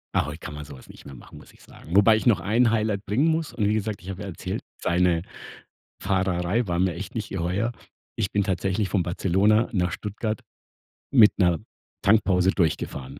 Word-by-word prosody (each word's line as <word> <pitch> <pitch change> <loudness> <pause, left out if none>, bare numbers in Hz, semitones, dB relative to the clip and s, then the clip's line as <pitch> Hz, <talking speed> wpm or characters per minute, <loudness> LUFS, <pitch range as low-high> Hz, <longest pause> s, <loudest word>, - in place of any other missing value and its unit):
Ah, - - +2
heute 75 +2 -7
kann 75 - -8
man 75 0 -7
so 70 -1 -11
was 65 - -16
nicht - - -14
mehr 70 - -10
machen, 65 - -13
muss - - -16
ich - - -22
sagen. 85 - -9
Wobei 105 +2 +6
ich 110 - -2
noch 115 -7 +4
ein 110 +6 +2
Highlight 110 -3 0
bringen 120 +11 +1
muss 160 -1 0
und 105 -3 0
wie 105 - +2
gesagt, 110 -1 -3
ich 95 - -10
habe 95 0 -6
ja - - -6
erzählt, 95 - -5 0.2
seine 85 -1 +2 0.8
Fahrerei 95 +3 0
war 85 -2 -1
mir 90 -1 +1
echt 100 +8 -7
nicht 110 -3 -4
geheuer. 95 +6 -1 0.4
Ich 105 -3 -2
bin 100 - +1
tatsächlich 95 +1 -1
von 95 - +1
Barcelona 95 +6 +2
nach 90 -4 0
Stuttgart 105 +2 -4 0.7
mit 115 -6 +6
'ner 85 -4 +3 0.4
Tankpause 95 -3 +3
durchgefahren. 70 -6 -2
95 Hz, 200 wpm, -25 LUFS, 90-110 Hz, 0.8 s, Wobei